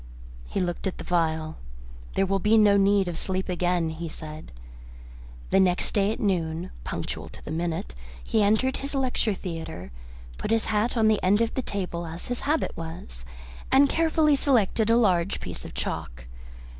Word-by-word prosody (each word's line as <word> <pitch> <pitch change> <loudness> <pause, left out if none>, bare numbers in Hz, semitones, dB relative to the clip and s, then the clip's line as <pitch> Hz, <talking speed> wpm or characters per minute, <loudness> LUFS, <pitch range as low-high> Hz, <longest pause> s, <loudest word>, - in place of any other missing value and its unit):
He - - -2
looked 175 0 -2
at 190 - -4
the - - -6
little 180 - -1
phial. 160 0 -5 0.6
"There 195 - +3
will 195 +1 +1
be 210 +4 +4
no 210 -2 +6
need 200 -1 +4
of 170 -2 -3
sleep 190 0 -2
again," 175 -2 0
he 165 +1 -5
said. 155 0 -8 1.0
The 195 - +5
next 180 -2 +2
day 200 0 +2
at - - -4
noon, 175 -4 -1
punctual - - -4
to - - -14
the - - -5
minute, 160 - -2 0.3
he 215 - +1
entered 220 +6 +2
his 280 +1 -4
lecture 250 -5 +1
theatre, 160 - -6 0.5
put - - -3
his 225 0 +2
hat 220 +3 0
on 220 -1 +4
the 215 -1 +3
end 200 +3 +3
of 230 0 +1
the 260 - -1
table 180 -6 -4
as 165 +6 -6
his 245 - -1
habit 310 +1 +1
was, - - -7 0.5
and 280 +1 +6
carefully 320 -2 +3
selected 230 -5 +2
a 230 - +5
large 185 -5 +2
piece - - -7
of - - -9
chalk. - - -4
190 Hz, 180 wpm, -26 LUFS, 165-220 Hz, 1.0 s, no